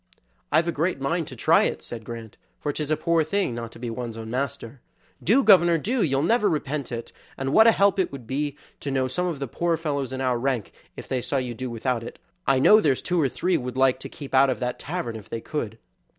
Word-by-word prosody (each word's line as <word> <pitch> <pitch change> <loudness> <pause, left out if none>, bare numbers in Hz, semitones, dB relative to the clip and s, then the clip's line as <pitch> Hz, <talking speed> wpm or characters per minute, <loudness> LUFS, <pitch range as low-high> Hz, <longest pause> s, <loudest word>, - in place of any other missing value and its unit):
"I've 165 +2 +3
a - - +2
great 165 0 -1
mind 160 +4 -1
to - - -9
try - - +4
at - - -1
it," - - -16
said 115 -2 -7
Grant, 115 -2 -8 0.2
"for 150 - -2
'tis 150 0 -3
a 155 - +2
poor 165 -1 +2
thing 190 -3 -1
not 115 -1 -5
to - - -12
be 120 -1 -4
one's 115 -1 -5
own 110 0 -7
master." 125 -1 -4 0.4
"Do, 245 - +4
governor, 175 -6 +6
do, 230 - -1
you'll 135 -4 +1
never 215 +3 +3
repent 150 -4 -2
it, 115 -1 -5 0.3
and 135 +1 -2
what 220 +1 +7
a - - +9
help 200 -2 +3
it 185 - +1
would 135 -4 -8
be 145 +3 -2 0.2
to 135 -2 -1
some 180 +7 -1
of 170 -4 -2
the 140 0 -4
poor 170 +7 0
fellows 140 -5 -2
in 130 - -4
our 125 -2 +1
rank 130 -4 -1 0.3
if - - -8
they 130 -2 -1
saw 140 - -1
you 125 -2 -2
do 130 +2 -5
without 115 +1 -1
it. 115 - -8 0.3
I 135 - +4
know 210 +11 +7
there's 140 -7 +1
two 180 -2 +1
or 140 - +2
three 180 +8 0
would 125 0 -5
like 130 -1 +3
to - - -7
keep 140 -3 -10
out 135 +1 +6
of 130 - -1
that 125 -1 -3
tavern 145 -8 -4
if 110 -3 -10
they 115 - -3
could." 115 -4 -4
135 Hz, 250 wpm, -25 LUFS, 125-165 Hz, 0.4 s, a